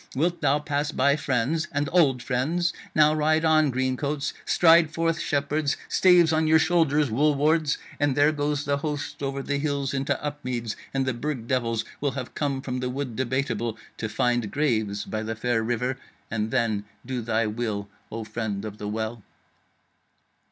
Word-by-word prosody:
Wilt 170 +6 0
thou 145 -1 +3
pass 150 0 -2
by 140 0 +3
friends, 145 +2 0
and 145 -1 0
old 140 -8 +3
friends? 160 +8 0 0.2
Now 155 0 +5
ride 155 +1 +2
on, 155 -2 +4
Green 130 0 0
Coats! 145 0 -2
stride 165 -2 +5
forth, 165 +1 0
Shepherds! 145 0 0
staves 175 -3 +5
on 160 0 +2
your 160 +1 +6
shoulders, 155 -4 +2
Wool 145 +6 +3
wards! 155 +1 +2 0.2
and 145 -2 +2
there 145 +2 +5
goes 145 -1 -1
the 140 0 +1
host 145 -1 -4
over 135 0 -2
the 145 +1 -1
hills 140 -2 -1
into 135 0 -1
Upmeads, 125 -6 -4 0.2
and 135 -1 0
the 130 - 0
Burg 125 -1 -4
devils 115 -3 0
will 140 -2 -1
have 130 -3 -6
come 140 -3 -2
from 125 -2 -3
the 125 0 -2
Wood 130 -2 -4
Debateable 120 -3 -1 0.2
to 110 - -3
find 120 -1 0
graves 110 -8 0
by 110 - -3
the 110 +1 -3
fair 115 0 0
river. 120 +3 -1 0.3
And 110 -1 -1
then 110 -3 0 0.2
do 125 -1 -3
thy 115 0 0
will, 105 -2 -3 0.2
O 115 0 -4
Friend 110 -2 -4
of 105 -1 -7
the 105 - -4
Well.'" 110 +2 -3
140 Hz, 175 wpm, -25 LUFS, 120-150 Hz, 0.3 s, your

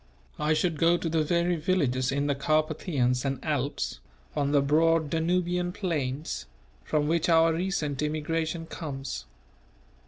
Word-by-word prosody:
I 150 +1 +2
should 165 -1 0
go 170 +1 +4
to 170 - -3
the 160 0 +2
very 170 +2 +1
villages 140 -7 +1
in 140 +1 0
the 145 - +2
Carpathians 150 -3 0
and 135 -1 -1
Alps, 140 - -2 0.4
on 140 -1 +1
the 145 - +5
broad 155 +2 +3
Danubian 175 +2 0
plains, 150 - -3 0.4
from 150 - 0
which 165 +1 +1
our 165 0 +5
recent 160 -6 -1
immigration 160 +2 -1
comes. 135 - -6
155 Hz, 135 wpm, -28 LUFS, 140-165 Hz, 0.4 s, the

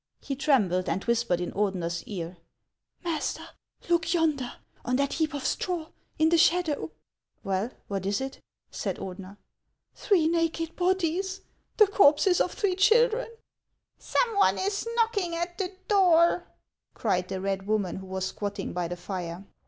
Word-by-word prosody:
He 275 - -4
trembled, 215 - +2
and 195 - -1
whispered 235 -6 +1
in 175 - -3
Ordener's 180 -4 -1
ear, 175 -3 -6 0.3
— - - -45
"Master, 320 -4 -2 0.4
look 335 0 +2
yonder, 300 -7 +1 0.3
on 250 - 0
that 280 +1 +1
heap 315 -2 -1
of 280 - -4
straw, 345 -4 -2 0.3
in 315 0 +4
the 335 0 +4
shadow! 320 - +2 0.2
" - - -63
" - - -47
Well, 195 +3 -1 0.2
what 195 -1 -3
is 200 0 +1
it? 265 0 -5 0.2
" - - -51
said - - -2
Ordener. 190 +1 -8 0.3
" - - -53
Three 350 -6 +2
naked 330 0 0
bodies, 375 +1 0 0.2
— - - -44
the 430 - +8
corpses 360 -2 +4
of 360 - +1
three 385 -3 0
children! 460 +4 +4 0.4
" - - -54
"Some 470 -3 0
one 400 - +4
is 400 +3 -1
knocking 425 -7 +1
at 345 +2 -4
the 375 -1 -1 0.2
door," 355 -4 +4 0.5
cried 185 -5 0
the 190 0 -4
red 195 0 -2
woman, 210 -4 0
who 190 0 -8
was 190 0 -3
squatting 200 0 -4
by 175 -1 -1
the 175 +1 -5
fire. 180 0 -5
290 Hz, 170 wpm, -27 LUFS, -, 0.5 s, the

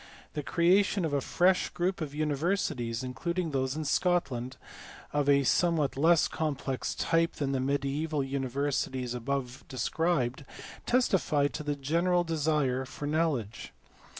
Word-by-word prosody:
The 150 - -2
creation 180 +5 +2
of 155 - -2
a 140 - +1
fresh 180 +5 +2
group 180 +1 -2
of 145 -2 -4
universities 150 - -1
(including 165 +7 -2
those 130 0 -1
in 155 0 -3
Scotland) 135 -8 0 0.6
of 145 -1 +1
a 140 0 +5
somewhat 160 0 +2
less 165 +4 +4
complex 140 -4 -3
type 165 +1 +1
than 140 -2 -2
the 135 - 0
mediaeval 140 +3 -1
univer 135 +1 -2
sities 130 -2 -2
above 125 +1 -3
described 135 0 0 0.4
testify 185 - +2
to 150 - -6
the 145 -1 -2
general 170 +6 +1
desire 150 -5 0
for 135 +2 -7
know 155 +2 +2
ledge. 115 -3 -6
145 Hz, 140 wpm, -29 LUFS, 135-165 Hz, 0.6 s, a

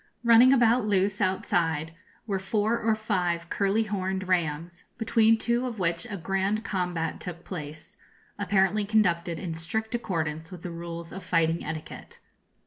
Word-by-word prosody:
Running 235 +2 +7
about 240 -3 +4
loose, 200 0 +1
outside, 165 -4 0 0.3
were 200 -4 -1
four 215 +4 0
or 220 0 +2
five 180 -6 -1
curly 200 +2 +2
horned 190 -2 -3
rams, 170 -1 -1
between 225 -1 +4
two 235 +3 0
of 235 -3 -5
which 170 +3 -1
a 205 - -4
grand 195 +5 -1
combat 180 -5 -2
took 175 -1 -7
place, 155 -2 -8 0.4
apparently 200 +1 +2
conducted 175 -5 +1
in 170 -1 -4
strict 220 +8 -3
accordance 160 -8 -2
with 180 -2 -10
the 180 - -5
rules 170 0 -7
of 190 0 -7
fighting 165 -2 +1
etiquette. 155 0 -7
190 Hz, 145 wpm, -27 LUFS, 170-215 Hz, 0.4 s, Running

